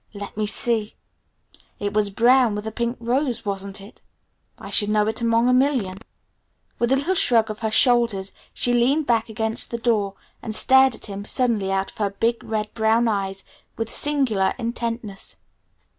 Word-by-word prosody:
Let 200 0 -8
me 210 0 -1
see, 220 0 0 0.8
it 205 0 -3
was 210 -1 +2
brown, 240 +2 +3
with 210 +1 -5
a 220 - -4
pink 235 +2 -3
rose 245 +1 -1
wasn't 200 0 -4
it? 200 +2 -14 0.6
I - - -10
should 205 -1 +4
know 210 0 +2
it 220 +2 -3
among 230 +1 +2
a 250 - +4
million." 250 -8 +1 0.8
With 235 +1 +1
a - - +5
little 285 +8 0
shrug 230 -10 +2
of 215 - -8
her 220 - -1
shoulders 230 -4 +2 0.2
she 245 - -1
leaned 265 +6 +2
back 230 -3 +1
against 220 +1 -1
the 235 - -3
door 215 -4 0 0.3
and 215 - -5
stared 265 +1 +4
at - - -8
him 200 -1 -6
suddenly 215 -4 0
out 195 0 -1
of - - -23
her 205 -2 0
big 230 +4 -1
red 215 -1 -3
brown 225 +1 +2
eyes 195 -2 -2 0.3
with 225 0 -3
singular 260 -10 +1
intentness. 230 -4 -5
225 Hz, 175 wpm, -22 LUFS, 205-240 Hz, 0.8 s, a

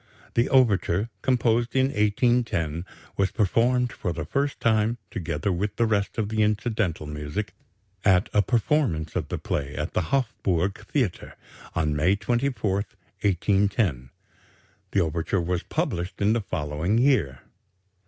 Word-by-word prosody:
The 120 +2 +2
overture, 110 -4 +3
composed 120 -1 +1
in 130 0 +3
1810, 105 - +1 0.3
was 100 -1 +2
performed 120 +3 +2
for 90 - -3
the 80 -2 -4
first 140 - -1
time, 110 +1 +2
together 85 -1 -2
with 100 +3 -2
the 115 - +2
rest 105 -3 0
of 105 -2 -1
the 110 0 0
incidental 105 -6 0
music, 75 +7 -4 0.5
at 95 -1 +4
a 105 - +5
performance 115 - 0
of - - -1
the - - -3
play 70 0 -3
at 75 +3 -3
the - - +1
Hofburg 100 -8 0
Theatre, 120 - -2 0.4
on 75 -2 +1
May 85 +7 +3
24, 120 -1 0 0.5
1810. 95 - +1 0.8
The 100 - +2
overture 85 +3 0
was 90 +1 -1
published 90 +2 -3
in 105 +2 +3
the 115 - 0
following 80 +2 -1
year. 115 - +2
100 Hz, 135 wpm, -25 LUFS, 85-115 Hz, 0.8 s, a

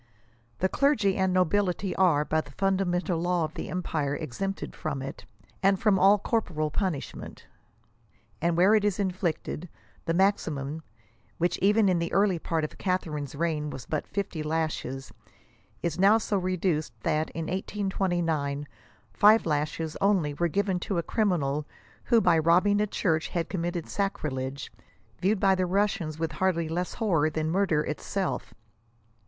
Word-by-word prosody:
The 190 - +2
clergy 220 -5 +2
and 190 -1 +1
nobility 185 +1 +1
are, 160 -6 +3
by 155 +1 +1
the 145 - -15
fundamental 185 -1 0
law 175 0 +1
of 155 - -8
the 170 - -6
empire 155 -6 -2
exempted 195 +8 -4
from 140 - -3
it, 135 - -7 0.4
and 195 0 +3
from 205 -3 +3
all 195 +3 +6
corporeal 175 -9 -1
punishment," 180 -7 -4 1.0
and 170 +1 +1
where 190 +4 +5
it 215 -2 +4
is 205 -3 +1
inflicted, 180 -3 -2 0.2
" - - -32
the 165 - +1
maximum, 160 -6 0 0.6
which 175 +1 0
even 210 +2 +4
in 180 -2 +2
the 170 - -2
early 195 -3 +3
part 160 -1 -1
of 155 - -5
Catharine's 155 -7 -2
reign 150 -1 -1
was 130 -4 -7
but 155 - -3
flfly 185 -6 -3
lashes, 150 -4 -3 0.7
is 170 -1 -2
now 200 +3 +6
so 215 -2 -2
reduced 180 - -1
that, 155 +6 0
in 165 0 -5
1829, 175 -7 -1 0.5
five 215 +2 +6
lashes 155 +1 -1
only 190 -7 +2
were 170 +4 0
given 195 +1 0
to 185 +1 -2
a 170 - 0
criminal 150 -10 0 0.4
who, 235 -2 +4
by 175 -6 +4
robbing 180 +6 +4
a 210 - +1
church, 165 -5 0
had 170 -2 -3
com 185 - -2
mitted 175 -1 -3
sacrilege, 140 -9 -3 0.5
viewed 195 +3 +1
by 195 0 +4
the 185 -1 0
Russians 180 -5 0
with 165 0 -2
hardly 170 0 0
less 175 +3 -3
horror 170 -10 +2
than 155 0 -2
murder 175 -5 +2
itself." 185 +5 -3
175 Hz, 155 wpm, -27 LUFS, 155-195 Hz, 1.0 s, all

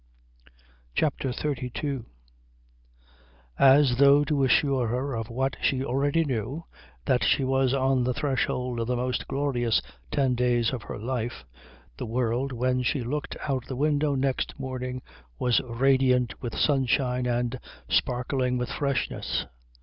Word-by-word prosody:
CHAPTER 135 -3 0
XXXII 135 0 -3 1.6
As 135 -2 +6
though 140 +1 +7
to 145 -1 +1
assure 130 -1 +3
her 130 +4 -2
of 115 0 -4
what 130 +3 -1
she 135 0 +1
already 145 +5 +1
knew, 130 +4 -3 0.4
that - - +2
she - - +3
was 135 -1 +2
on 130 -1 +2
the 125 +1 0
threshold 125 -3 -1
of 115 - -2
the 125 - 0
most 125 0 -2
glorious 135 -5 +1 0.3
ten 135 - +1
days 120 -1 +1
of 125 - -3
her - - -7
life, 115 - -4 0.5
the - - -5
world 120 +3 -1
when 125 +1 0
she 125 +1 0
looked 145 +5 -4
out 130 -3 -1
of - - -20
the 130 - -3
window 145 +1 +1
next 135 +1 -1
morning 130 -1 -4 0.3
was 125 -2 +2
radiant 125 0 +2
with 120 -3 -4
sunshine 130 -3 +1
and 120 +1 -1 0.3
sparkling 125 0 0
with 125 0 -2
freshness. 140 -3 -1
130 Hz, 140 wpm, -26 LUFS, 125-140 Hz, 1.6 s, though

